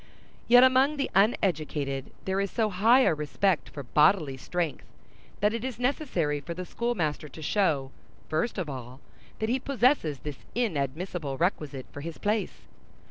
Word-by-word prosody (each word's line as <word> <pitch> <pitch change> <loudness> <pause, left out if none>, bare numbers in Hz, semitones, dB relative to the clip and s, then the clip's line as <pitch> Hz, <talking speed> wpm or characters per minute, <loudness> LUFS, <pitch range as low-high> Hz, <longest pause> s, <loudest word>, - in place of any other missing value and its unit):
Yet 245 +1 +8
among 260 +3 +4
the 280 - -1
uneducated 155 - +1 0.2
there 190 +1 0
is 200 - -1
so 220 0 0
high 225 +8 +5
a 255 - +4
respect 155 +4 0
for 140 - -7
bodily 150 +2 +3
strength, 165 +3 -3 0.5
that 210 +1 +3
it 230 0 -3
is 255 -4 -4
necessary 245 - 0
for 170 +4 -7
the 180 +1 -5
schoolmaster 175 -11 -2
to 160 - -11
show, 150 -8 +1 0.4
first 160 +10 -1
of 185 -5 -2
all, 130 -2 -7 0.4
that 220 - -1
he 255 +3 +1
possesses 250 - +2
this 145 0 -7 0.2
inadmissible 160 - -2
requisite 150 -6 -1
for 145 - -8
his 165 +1 -6
place. 210 +1 -1
180 Hz, 155 wpm, -28 LUFS, 150-230 Hz, 0.5 s, Yet